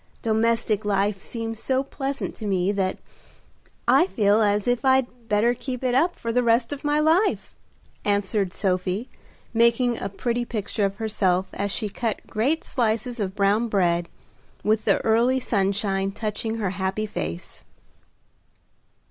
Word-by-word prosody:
Domestic 225 -1 +1
life 200 0 +1
seems 225 +1 -5
so 265 +2 +1
pleasant 275 0 -4
to 215 - -5
me 190 -1 +1
that 195 -2 -1 0.9
I 355 - +5
feel 210 - +3
as 205 0 +2
if 245 +1 +1
I'd 255 -3 +1
better 215 +3 +3
keep 250 0 -6
it 250 -1 +1
up 335 +8 +3
for 230 0 -4
the 250 - +3
rest 235 +2 +2
of 285 - -8
my 295 0 +2
life," 330 +7 +2 0.5
answered 200 -1 +1
Sophie, 185 +5 -1 0.4
making 235 +1 +3
a 195 - -2
pretty 240 +4 -2
picture 215 -2 -2
of 195 0 -2
herself 195 -4 0
as 200 - -2
she 215 +1 -1
cut 220 +2 -3
great 265 +9 0
slices 235 0 -1
of 190 -2 -2
brown 205 +3 +2
bread, 175 -5 +1 0.5
with 215 0 +1
the - - +4
early 235 +4 +3
sunshine 195 -3 0
touching 220 +2 -3
her 205 -5 -1
happy 190 +3 -2
face. 85 - -6
220 Hz, 150 wpm, -24 LUFS, 200-240 Hz, 0.9 s, I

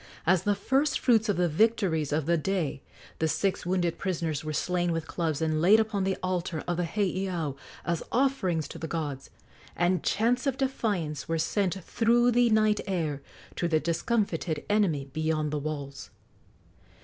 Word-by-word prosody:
As 175 0 +4
the 205 0 +1
first 270 +8 +1
fruits 225 -3 +3
of 205 - +1
the 175 0 +3
victories 170 -4 +1
of 150 0 0
the 170 +2 +3
day, 165 -5 -1 0.4
the 160 - +2
six 190 +3 -1
wounded 175 -2 0
prisoners 165 -6 -2
were 155 - -3
slain 175 +3 0
with 165 -1 -2
clubs 160 -3 -2
and 155 -1 0
laid 200 +6 +6
upon 215 -3 0
the 190 0 0
altar 180 -3 -2
of 175 -1 -1
the 175 - 0
heiau 185 -6 -1 0.3
as 170 0 -1
offerings 190 - +1
to - - -8
the 160 - -4
gods, 145 -5 -4 0.5
and 175 0 +2
chants 245 +5 +1
of 270 -1 0
defiance 205 - -2
were 165 - 0
sent 185 +3 0
through 240 +4 +3
the 240 0 +4
night 215 -1 +3
air 160 -7 -1 0.3
to 175 - 0
the 160 -2 +2
discomfited 170 -2 -1
enemy 180 -10 +2
beyond 155 -1 0
the 150 - -1
walls. 140 -2 -5
175 Hz, 170 wpm, -28 LUFS, 155-210 Hz, 0.5 s, laid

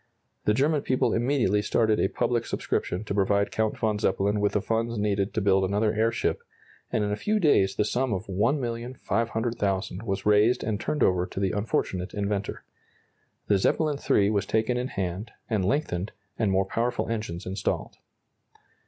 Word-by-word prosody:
The 105 - +3
German 145 +4 +2
people 130 -2 +1
immediately 120 -4 +2
started 110 +1 +2
a - - +3
public 120 +3 -1
subscription 90 +4 -2
to 105 - -4
provide 100 0 +2
Count 110 -1 0
von 110 -2 0
Zeppelin 100 0 +1
with 105 0 +1
the 105 - +2
funds 115 +1 -1
needed 100 -1 0
to 110 - +1
build 95 -1 +3
another 105 +3 +1
airship, 115 +1 0 0.5
and 110 - +1
in 105 - -1
a - - +1
few 210 - 0
days 100 - +3
the 105 - +1
sum 125 +3 0
of 100 +1 -2
$1,500,000 115 -3 -1
was 95 -4 -3
raised 105 +3 +4
and 105 -2 -1
turned 150 +6 0
over 90 -1 +2
to - - -6
the 95 -2 +1
unfortunate 95 -3 -2
inventor. 100 -1 -2 0.8
The 100 -2 +3
"Zeppelin 150 - +1
III" 100 0 +4
was 100 -2 0
taken 110 +2 +1
in 125 +1 -1
hand, 95 +1 -4
and 110 -5 0
lengthened, 100 - -1 0.2
and 110 -3 0
more 95 0 +2
powerful 120 +4 -1
engines 105 -7 -4
installed. 95 +2 -3
105 Hz, 170 wpm, -26 LUFS, 100-115 Hz, 0.8 s, raised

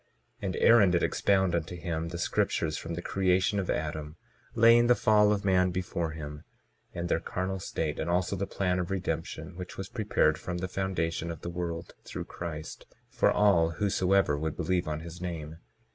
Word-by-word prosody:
22:13 - - -4
And 90 - -2
Aaron 115 -5 +6
did 85 -1 +2
expound 95 -3 +2
unto 85 +1 -2
him 85 -2 -3
the 85 +1 -5
scriptures 80 -2 0
from 85 +1 -5
the 85 - -5
creation 95 +1 +1
of 95 - -3
Adam, 75 0 -3 0.4
laying 115 +1 +6
the 125 - +6
fall 105 -2 +4
of 100 -1 -1
man 90 -1 +4
before 90 -2 -2
him, 75 -2 -7 0.5
and 85 0 -4
their 85 - +1
carnal 95 +3 -3
state 80 -3 -3
and 80 - -2
also 90 +2 +1
the 100 +1 -3
plan 90 -2 0
of 90 - -2
redemption, 95 -2 -3
which 90 -1 -7
was 95 0 -5
prepared 100 -9 +1
from 90 -1 -4
the 90 +1 -3
foundation 85 -3 -2
of 80 -2 -6
the 85 - -5
world, 85 -1 -4
through - - -6
Christ, 80 -3 -7 0.2
for - - +3
all 85 -6 +4
whosoever 95 -3 +2
would 80 +1 -3
believe 90 -3 0
on 75 0 -3
his 85 +1 -9
name. 80 -3 -5
90 Hz, 190 wpm, -29 LUFS, 80-95 Hz, 0.5 s, Aaron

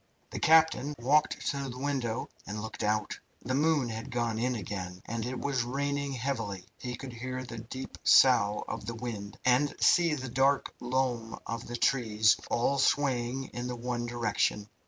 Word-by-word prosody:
The - - -4
captain 160 -2 +4
walked 140 +6 +2
to 140 -1 -4
the 125 - -7
window 130 -4 -2 0.2
and 105 +1 -4
looked 110 +1 -6
out. 105 0 0 0.2
The 130 - -2
moon 145 -2 +2
had 115 +2 -5
gone 120 -3 -1
in 125 +1 0
again, 90 -3 -5
and 115 0 -3
it 130 0 -4
was 135 -3 0
raining 140 +2 -2
heavily. 115 -8 -3
He 125 -1 -4
could 130 +1 -8
hear 130 +2 -5
the 115 -2 -7
deep 130 +4 -8
sough 110 -6 +5
of - - -5
the 115 - -3
wind, 110 -4 -6
and 130 +3 +3
see 170 -3 +4
the 130 -2 -5
dark 135 +3 +2
loom 120 -2 -1
of 115 +1 -5
the 120 - -4
trees, 110 -5 +3
all 135 +4 +1
swaying 130 -2 +1
in 120 0 -4
the 125 - -3
one 120 0 -3
direction. 115 -3 0
125 Hz, 175 wpm, -30 LUFS, 115-135 Hz, 0.2 s, sough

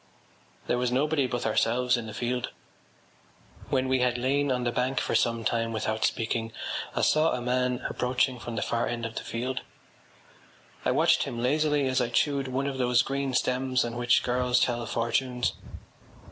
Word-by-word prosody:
There 125 - 0
was 125 -1 0
nobody 140 +1 +1
but 120 -1 -3
ourselves 120 +3 +2
in 120 -2 -4
the 110 - -7
field. 125 +1 -2 1.2
When 130 -1 +1
we 130 0 +2
had 125 -1 +1
lain 140 +3 +1
on 125 -1 0
the 120 - 0
bank 125 +2 0
for - - -2
some 115 -1 +1
time 115 0 0
without 110 0 0
speaking 115 0 -1 0.4
I - - +1
saw 155 +1 +3
a 125 - -1
man 125 0 0
approaching 125 0 0
from 120 0 -6
the 110 - -1
far 115 0 0
end 120 -1 -3
of 115 - -5
the - - -4
field. 125 +3 -3 1.2
I - - +3
watched - - +3
him 120 - -5
lazily 145 +3 +2
as 130 0 +1
I 115 - 0
chewed 140 +3 +1
one 130 +2 -1
of 135 -1 -3
those 125 -1 +3
green 135 -1 -2
stems 130 -1 +1
on 120 0 -5
which 120 0 +3
girls 125 0 +2
tell 120 -1 +1
fortunes. 120 +2 0
125 Hz, 180 wpm, -27 LUFS, 120-130 Hz, 1.2 s, saw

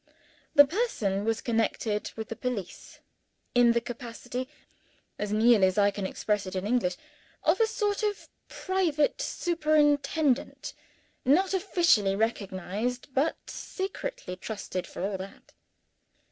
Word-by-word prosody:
The 285 - +10
person 250 - -1
was 225 0 0
connected 225 -2 -1
with 220 -1 -6
the 225 - -4
police, 230 -8 -5 0.5
in 240 -1 +5
the 235 - +3
capacity 245 +1 -6 0.7
(as 210 0 -2
nearly 215 -2 +5
as 185 - -2
I 205 0 +5
can 195 -1 -3
express 205 0 -1
it 185 - -6
in 185 +1 -2
English) 210 -6 +1 0.5
of - - +3
a 450 - +4
sort 415 -2 -1
of 420 -1 -2 0.2
private 345 -6 0
superintendent 305 -4 +1 0.5
not 360 +9 +3
officially 340 - +3
recognized, 220 +4 -2
but 280 +5 +1
secretly 385 - -5
trusted 185 -2 -5
for - - -6
all 195 -1 -3
that. 190 +1 -10
240 Hz, 125 wpm, -28 LUFS, 205-310 Hz, 0.7 s, The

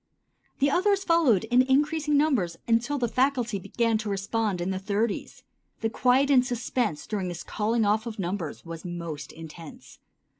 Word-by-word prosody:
Then 280 +1 +3
others 395 +4 +2
followed 330 - +3
in 245 +3 +4
increasing 295 +3 +2
numbers 240 - +1
until 235 +5 +1
the 245 -3 0
faculty 245 -3 0
began 225 +4 0
to 215 -1 -4
respond 200 0 -1
in 175 +2 -1
the 190 - -2
thirties. 205 +2 -2 0.4
The 225 0 0
quiet 260 +4 +3
and 255 -2 +6
suspense 245 - -2
during 200 -4 -3
this 175 -1 -5
calling 220 +1 0
off 215 +3 +1
of 225 - -6
numbers 175 -5 -4
was 165 -1 -7
most 170 -5 -6
intense. 165 0 -11
225 Hz, 160 wpm, -27 LUFS, 190-260 Hz, 0.4 s, and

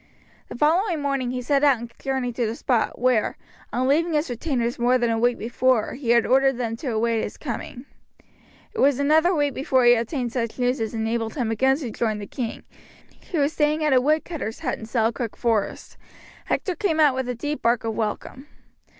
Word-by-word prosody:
The - - -8
following 335 - +2
morning 275 -3 -1
he 250 0 -3
set 280 +3 +1
out 280 -3 +5
and 235 +1 -9
journeyed 260 -3 -2
to 240 -3 +1
the 220 - -3
spot, 240 -2 0
where, 245 -3 +1 0.3
on 250 +3 0
leaving 325 +5 +2
his 300 -3 0
retainers 240 -2 -2
more 245 +2 +3
than 240 -2 0
a 225 - 0
week 240 +1 +2
before, 240 0 +1
he 250 -2 -6
had 235 -1 +5
ordered 270 0 +3
them 230 -2 -2
to 270 - -7
await 225 0 +1
his - - -5
coming. 250 -1 -6 0.9
It - - -6
was 275 -1 +4
another 310 +5 +3
week 290 -2 +1
before 265 -3 +1
he 240 - +8
obtained 240 +1 -2
such 230 -3 -2
news 250 0 0
as 225 +1 -3
enabled 225 0 -2
him 240 -6 -1
again 265 +4 +2
to 260 -7 -5
join 215 -1 -1
the 205 - -6
king, 230 +2 -5 0.7
who 350 - -1
was 285 +3 +1
staying 300 +1 +1
at 300 -3 +3
a 255 - +5
woodcutter's 305 -4 -1
hut - - -2
in 220 - -8
Selkirk 230 0 -1
Forest. 225 -4 -1 0.5
Hector 370 - -1
came 335 -6 0
out 295 -3 +5
with 260 -1 -3
a 250 - -2
deep 295 +6 -4
bark 235 0 +2
of 225 -1 -2
welcome. 225 +5 -4
250 Hz, 205 wpm, -23 LUFS, 230-285 Hz, 0.9 s, he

